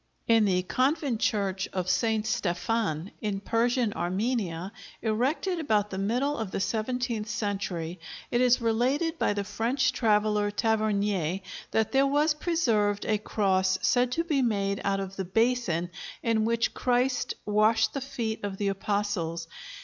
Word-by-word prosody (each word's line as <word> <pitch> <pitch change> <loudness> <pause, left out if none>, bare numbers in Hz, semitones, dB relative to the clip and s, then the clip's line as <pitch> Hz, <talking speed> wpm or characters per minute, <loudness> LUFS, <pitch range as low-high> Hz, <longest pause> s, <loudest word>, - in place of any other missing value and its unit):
In 225 -2 +5
the 180 -2 +2
convent 265 - 0
church 195 -3 0
of 185 -2 -2
St. 220 +3 +1
Stephan, 195 -3 -1
in 205 -2 -2
Persian 230 +1 +1
Armenia, 185 -1 -2 0.3
erected 265 - 0
about 210 -9 +1
the 190 - -3
middle 250 +9 0
of 220 -3 -3
the - - -3
seventeenth 225 +1 -2
century, 195 -5 -3 0.3
it 240 - +2
is 250 -1 +4
related 260 +8 0
by - - +2
the 205 0 -2
French 235 +6 0
traveller 210 -3 +2
Tavernier 205 -4 0 0.3
that 220 -1 +1
there 275 0 +4
was 295 +3 +3
preserved 230 - +1
a 215 -1 +1
cross 190 -3 +1
said 245 -1 +3
to 335 - 0
be 300 -5 +1
made 200 -4 0
out 195 0 +1
of 195 0 -6
the 190 - -1
basin 190 -4 0 0.3
in 225 -2 +2
which 230 0 +1
Christ 250 +1 0
washed 215 +1 +3
the 275 - -3
feet 240 -6 -4
of 200 -1 -3
the 200 0 0
Apostles. 195 -4 -2
215 Hz, 150 wpm, -28 LUFS, 195-245 Hz, 0.3 s, In